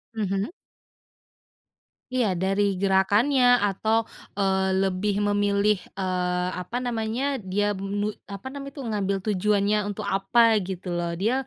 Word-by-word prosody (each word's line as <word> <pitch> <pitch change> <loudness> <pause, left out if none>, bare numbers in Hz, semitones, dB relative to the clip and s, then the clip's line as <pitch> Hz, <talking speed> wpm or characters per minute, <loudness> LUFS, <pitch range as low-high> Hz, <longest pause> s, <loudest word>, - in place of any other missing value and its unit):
Mhm. 200 +1 -1 1.6
Iya 215 -8 +1
dari 195 +1 +1
gerakannya 230 +7 +4
atau, 220 +3 +1 0.3
eee, 190 -1 +1
lebih 195 +1 0
memilih, 205 0 +2 0.2
eee, 180 -1 -1
apa 230 +7 -5
namanya 245 +2 -2
dia 205 +2 0
mi 205 +2 -2 0.2
apa 200 +2 -8
namanya 275 0 -7
itu 275 - -5
ngambil 200 -2 0
tujuannya 210 0 +2
untuk 205 +1 -5
apa 195 +4 +2 0.2
gitu 180 -1 -5
loh, 175 0 -1
dia 225 +5 +2
200 Hz, 120 wpm, -25 LUFS, 190-220 Hz, 1.6 s, gerakannya